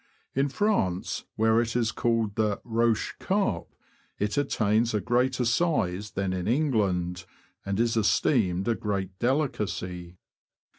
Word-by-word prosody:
In 135 +2 +1
France, 135 - 0
where 110 +1 +3
it 115 0 -3
is 115 -2 +1
called 115 -3 0
the 105 -1 0
roche 115 -1 +1
carpe, 190 - -1 0.4
it 105 0 -1
attains 115 -5 +1
a - - +2
greater 125 +4 +1
size 105 - 0
than 95 -1 -1
in 90 -1 -3
England, 100 - 0 0.4
and 100 +1 -1
is 115 0 +2
esteemed 105 -3 +2
a 120 - +3
great 100 -4 -3
delicacy. 90 - -2
110 Hz, 130 wpm, -27 LUFS, 95-120 Hz, 0.4 s, where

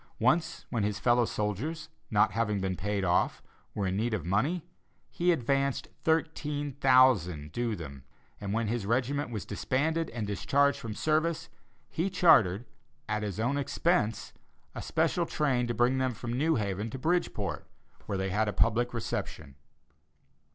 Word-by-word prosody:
Once 160 +7 +1
when 115 - 0
his 105 0 -1
fellow 120 +3 +3
soldiers, 130 - -3 0.2
not 105 0 +3
having 105 -1 0
been 95 -1 -1
paid 100 +1 -2
off, 90 0 +1 0.3
were 100 - -1
in 95 0 -1
need 110 +1 0
of 100 - -5
money, 135 - 0 0.5
he 175 +1 +2
advanced 140 -2 0
$13,000 130 - +2
due 120 +3 -1
them, 70 -7 -9 0.4
and 100 -1 -4
when 115 +1 0
his 110 -2 -2
regiment 130 +5 0
was 110 -4 -5
disbanded 155 +10 -1
and 115 -2 -4
discharged 135 +8 +1
from 110 -2 -6
service, 160 +3 0 0.4
he 175 +5 -1
chartered, 120 - +4 0.4
at 105 -1 -1
his 105 -2 -4
own 125 +5 +1
expense, 140 -7 0 0.4
a - - -6
special - - 0
train 130 -5 0
to 120 - -1
bring 125 +3 +2
them 130 -2 0
from 120 +2 -5
New 155 +6 +2
Haven 105 0 -2
to 130 - -6
Bridgeport, 175 +6 -1 0.4
where 100 - -2
they 95 0 -2
had 110 +3 +1
a 105 - -1
public 120 +2 +1
reception. 75 -9 -4
120 Hz, 155 wpm, -29 LUFS, 105-145 Hz, 0.5 s, chartered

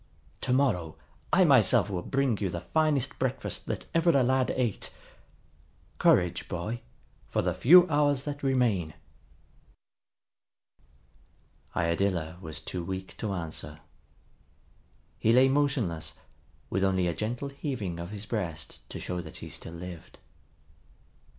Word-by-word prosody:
To - - -1
morrow 110 - +1 0.3
I - - +6
myself - - +5
will 90 -2 -2
bring 135 -1 0
you 100 - -1
the 85 -1 -4
finest 145 - +1
breakfast 130 0 -2
that - - -3
ever 165 +1 +3
a 140 -6 +5
lad 130 +1 +2
ate. 120 -6 -1 1.1
Courage, - - +3
boy, 105 +7 -3 0.5
for - - 0
the - - +1
few 180 +7 +7
hours 145 -3 +2
that 145 0 -5
remain." 115 - +1 2.8
Iadilla 85 -1 0
was 80 -6 -7
too 90 -2 -5
weak 95 +2 -5
to 110 - -3
answer. 80 -3 -5 1.4
He 110 - +3
lay 130 +3 +6
motionless, 125 - 0 0.6
with 95 - +1
only 95 -2 +2
a 85 - 0
gentle 120 - -3
heaving 125 - -4
of 85 +1 -5
his 105 0 -6
breast 90 -8 -5
to - - -6
show 90 -1 -3
that - - -10
he - - -8
still 80 - -8
lived. 85 -1 -9
105 Hz, 130 wpm, -29 LUFS, 85-135 Hz, 2.8 s, few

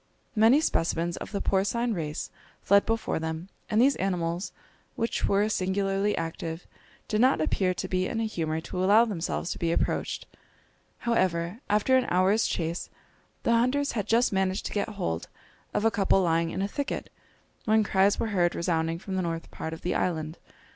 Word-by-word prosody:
Many 225 +7 +5
specimens 170 - 0
of - - -7
the 200 - -2
porcine 225 +5 +1
race 155 -5 -4 0.3
fled 200 +1 +4
before 225 -6 0
them, 160 +3 -4 0.2
and 215 -1 +2
these 275 +3 +5
animals, 175 -1 -1 0.4
which 230 - -1
were 200 +1 +2
singularly 195 0 0
active, 165 0 -4 0.4
did 215 +1 +1
not 260 -5 +4
appear 185 +3 +1
to 185 - -3
be 185 0 0
in 225 - -3
a - - 0
humour 160 -6 -2
to 180 +2 -3
allow 210 +5 +6
themselves 180 -4 -3
to - - -5
be 165 -1 0
approached. - - -1 0.8
However, 185 -4 +1
after 215 +5 +4
an 255 - +1
hour's 190 +5 +3
chase, 165 0 -3 0.5
the - - +2
hunters 255 +5 +2
had 210 -5 -3
just 235 0 +3
managed 190 0 0
to - - -4
get 205 +1 -1
hold 180 - -3 0.4
of 210 - 0
a 225 - +5
couple 195 -2 +3
lying 165 -1 +2
in 190 - -2
a - - 0
thicket, 285 +7 -4 0.5
when 220 0 +4
cries 195 0 +3
were 225 - -1
heard 175 -2 +2
resounding 165 -1 0
from 190 +2 -5
the - - +1
north 165 -1 -4
part 160 - -5
of 160 - -7
the 180 - 0
island. 160 -2 -2
190 Hz, 180 wpm, -27 LUFS, 170-220 Hz, 0.8 s, allow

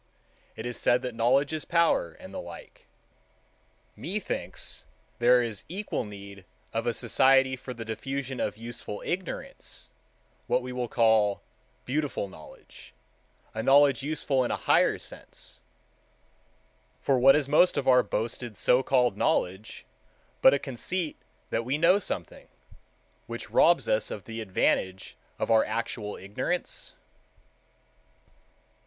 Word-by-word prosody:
It 110 - -7
is 120 -1 -3
said 120 - +3
that 125 -1 -3
knowledge 130 +6 +2
is 155 - -2
power, 170 - +2
and - - -12
the - - -4
like. - - -12 1.1
Methinks 205 +1 -4 0.4
there 125 +1 +5
is 110 -4 -4
equal 195 - -3
need 100 -1 -10 0.3
of 115 +1 -1
a 120 - +2
Society 130 +2 +4
for 130 0 -8
the 115 -2 -7
Diffusion 135 +3 -4
of - - -2
Useful 115 -2 -6
Ignorance, 180 0 -5 0.6
what 125 - +1
we 125 - -6
will 125 -1 -2
call 110 -3 +3 0.4
Beautiful 140 -6 -1
Knowledge, 80 -5 -14 0.6
a 110 - -2
knowledge 135 +1 +5
useful 140 -2 0
in 120 - -2
a - - 0
higher - - +3
sense: - - -8 1.4
for 135 -2 +2
what 135 +2 +7
is 145 -2 +1
most 155 +5 +4
of 140 - -1
our 125 -1 +7
boasted 115 +1 -4
so 125 - +4
called 125 -5 +2
knowledge 95 +1 -1 0.6
but - - +8
a 140 - +3
conceit 150 +5 -3 0.4
that 115 - 0
we 130 +5 -1
know 175 +5 +5
something, 85 - -5 0.8
which 115 0 -7
robs 170 +1 +4
us 110 0 +1
of 100 - -6
the 115 0 -6
advantage 95 -2 0 0.2
of - - -1
our 110 -1 +6
actual 110 -1 -3
ignorance? 105 - -4
125 Hz, 135 wpm, -28 LUFS, 110-140 Hz, 1.4 s, but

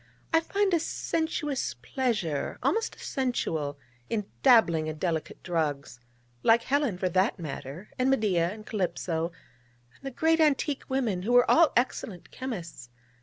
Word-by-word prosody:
I 325 - +7
find 395 +3 0
a 340 - +4
sensuous 300 - -2
pleasure, 175 - -2
almost 450 +1 0
a - - -19
sensual, 160 - -2 0.3
in 210 -3 -1 0.2
dabbling 175 - +5
in 155 0 -4
delicate 160 -1 -3
drugs 150 -7 -2 0.4
like 230 - +4
Helen, 275 -8 +1
for 185 - 0
that 185 +5 +2
matter, 155 +2 -7
and 255 +1 +3
Medea, 195 -10 +2
and 215 +1 -10
Calypso, 175 -4 -2 0.6
and - - -25
the 270 - -3
great 320 +5 +2
antique 295 -2 +1
women, 240 -9 0
who 230 +6 -1
were 245 0 +6
all 335 -1 +6
excellent 220 -7 -2
chymists. 180 - -6
215 Hz, 145 wpm, -28 LUFS, 165-270 Hz, 0.6 s, I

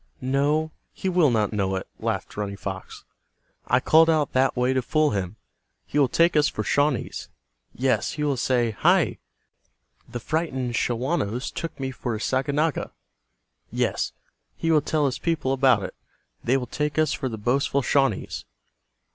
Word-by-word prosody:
"No, 145 +4 +1 0.2
he 190 - -2
will 175 -5 +4
not 110 -3 +1
know 95 -2 0
it," 95 - -4
laughed - - -3
Running 100 -1 -4
Fox. 95 -1 -7 0.6
"I 125 - +4
called 160 +5 +5
out 155 -4 +1
that 130 0 +2
way 125 +1 +2
to 130 - +1
fool 155 +4 +2
him. 95 -1 -3 0.5
He 150 - -1
will 140 - +5
take 170 +6 +3
us 150 -1 +4
for - - -3
Shawnees. 145 -3 0 0.5
Yes, 125 -4 +1
he 150 - -3
will 145 -2 +1
say, 120 -2 +1
'Hi, 105 - +2 0.9
the 120 - -5
frightened 130 -3 -2
Shawanos 125 0 -1
took 165 - -6
me 135 -1 -2
for 125 -2 -4
a - - -5
Saganaga.' 140 +5 0 0.8
Yes, - - 0 0.5
he 165 - 0
will 155 -2 +5
tell 150 0 0
his 130 -2 -1
people 155 -6 0
about 135 -1 +4
it. - - -5 0.5
They 130 +3 +3
will 125 - -3
take 150 +5 -3
us 155 -2 +3
for 130 - -2
the 110 - -5
boastful 135 +5 +1
Shawnees." 135 -8 0
135 Hz, 165 wpm, -25 LUFS, 120-150 Hz, 0.9 s, called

